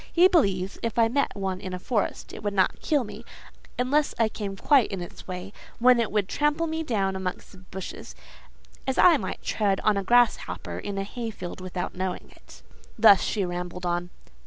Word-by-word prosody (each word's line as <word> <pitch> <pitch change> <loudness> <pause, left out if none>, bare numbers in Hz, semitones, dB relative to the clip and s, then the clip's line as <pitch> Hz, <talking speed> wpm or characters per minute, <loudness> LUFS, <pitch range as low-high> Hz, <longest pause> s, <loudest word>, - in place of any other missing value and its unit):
He 355 +2 +6
believes, 195 - +1
if 230 -1 -3
I 230 -1 +5
met 280 +3 0
one 190 -2 -3
in 185 -2 -5
a - - -4
forest, 210 +2 -2
it - - -8
would 205 -1 -2
not 190 -1 +2
kill 295 -4 +1
me, 210 - -9 0.5
unless 285 +4 +1
I 225 -1 +3
came 205 -2 -5
quite 270 0 +4
in 195 - -3
its 175 - -9
way; 185 +2 -6 0.2
when 250 0 +5
it 230 - 0
would 205 -2 +1
trample 295 +6 +1
me 320 0 -2
down 200 -10 -1
amongst 185 -1 -5
the 190 - -15
bushes, 185 0 -8 0.7
as 265 - -1
I 345 -4 +7
might 190 -6 -5
tread 200 -3 0
on 215 -2 +2
a 200 - -1
grasshopper 240 +4 +1
in 200 -1 -5
a 195 - -1
hayfield 210 -4 -6
without 185 -1 -4
knowing 185 0 -4
it." - - -17 0.3
Thus 205 -4 +7
she 200 -4 -1
rambled 180 0 -5
on. 175 0 -1
200 Hz, 195 wpm, -26 LUFS, 185-245 Hz, 0.7 s, I